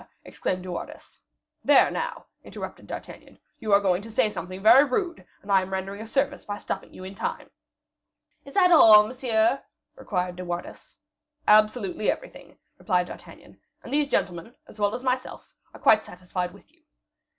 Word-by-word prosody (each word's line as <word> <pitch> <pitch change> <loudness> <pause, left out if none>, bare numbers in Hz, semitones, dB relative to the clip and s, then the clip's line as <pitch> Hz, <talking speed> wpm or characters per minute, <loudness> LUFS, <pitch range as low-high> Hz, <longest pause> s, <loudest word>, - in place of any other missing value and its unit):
exclaimed 185 -1 -3
De 185 - -6
Wardes. 175 - -9 0.4
"There, - - +5
now," - - -4 0.2
interrupted - - -9
D'Artagnan, - - -10 0.2
"you 215 - -4
are 200 - +7
going 190 -2 +1
to 225 - -10
say 215 -1 +1
something 185 -1 -7
very 220 +7 +7
rude, 340 +5 -2 0.2
and 200 - -6
I 195 -1 +5
am 185 +1 -7
rendering 195 +2 -4
a 225 - -8
service 275 +4 -1
by 205 0 -5
stopping - - -6
you - - -11
in 190 +1 -8
time." - - -5 0.9
"Is 275 - -14
that 360 -2 +5
all, 215 -10 +8
monsieur?" 240 0 0 0.3
inquired 180 -3 -3
De 180 - -6
Wardes. 175 0 -7 0.5
"Absolutely 215 -1 +3
everything," - - -6 0.2
replied 180 -3 +1
D'Artagnan; - - -13 0.2
"and - - -8
these 295 0 +2
gentlemen, 185 -2 -2
as 215 - -15
well 205 +1 +1
as 250 - -7
myself, 255 0 -3 0.2
are - - -14
quite 215 0 +4
satisfied 180 0 -5
with 200 +9 -19
you." 335 - -32
210 Hz, 170 wpm, -25 LUFS, 185-255 Hz, 0.9 s, all